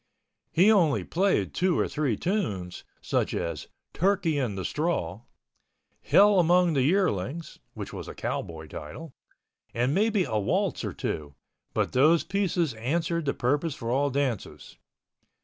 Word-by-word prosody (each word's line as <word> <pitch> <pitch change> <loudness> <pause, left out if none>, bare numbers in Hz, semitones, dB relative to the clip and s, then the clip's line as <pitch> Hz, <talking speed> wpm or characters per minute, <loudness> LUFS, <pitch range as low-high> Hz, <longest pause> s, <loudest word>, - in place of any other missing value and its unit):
He 190 +6 +5
only 170 -9 +3
played 190 +3 0
two 180 -1 +1
or - - +1
three 140 -8 -1
tunes, 105 - -2 0.2
such - - 0
as 80 -3 -4 0.3
"Turkey 180 -4 +1
in 120 -7 -1
the 95 -2 -4
Straw," 115 - -2 0.8
"Hell 205 -1 +5
Among 175 0 +4
the 135 - +2
Yearlings" 155 - 0 0.2
(which - - -7
was - - -7
a - - -8
cowboy 80 -1 -4
title) 125 - -9 0.6
and 125 +4 +1
maybe 210 +1 +2
a 110 -9 -1
waltz 100 - 0
or - - -3
two, 75 -2 -4 0.4
but - - 0
those 155 +6 +4
pieces 180 - 0
answered 165 +8 -1
the 140 - 0
purpose 145 +5 0
for 115 0 -4
all 140 +3 +2
dances. 135 -5 -3
150 Hz, 145 wpm, -27 LUFS, 115-180 Hz, 0.8 s, He